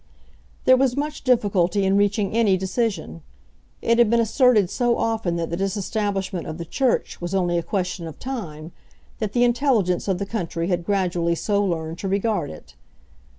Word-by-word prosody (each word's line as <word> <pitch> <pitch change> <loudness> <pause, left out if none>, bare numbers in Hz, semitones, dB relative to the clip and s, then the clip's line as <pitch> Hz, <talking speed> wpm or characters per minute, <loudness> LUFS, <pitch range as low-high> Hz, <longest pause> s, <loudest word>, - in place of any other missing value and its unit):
There 255 0 +7
was 260 -1 +1
much 300 +1 -3
difficulty 200 -6 +2
in 190 +1 +3
reaching 205 0 +1
any 210 -5 +3
decision. 190 -3 -2 0.6
It 230 +1 +3
had 235 -3 +5
been 235 +1 +3
asserted 230 -4 +3
so 240 -2 +1
often 225 -6 -1
that 170 -1 -3
the 170 - -2
disestablishment 195 -1 -2
of 155 - -5
the 170 - -6
Church 255 - -1
was 175 +2 -3
only 175 -2 +1
a - - -2
question 180 -1 -3
of 160 - -9
time, 170 - -6 0.5
that 215 -2 -3
the 245 - +3
intelligence 240 -8 +2
of 190 -2 +1
the 200 - -3
country 175 -5 -3
had 175 -2 -1
gradually 175 -4 +1
so 205 +3 0
learned 165 -3 -3
to 195 - -3
regard 200 -3 0
it. 80 - -12
195 Hz, 175 wpm, -23 LUFS, 175-230 Hz, 0.6 s, There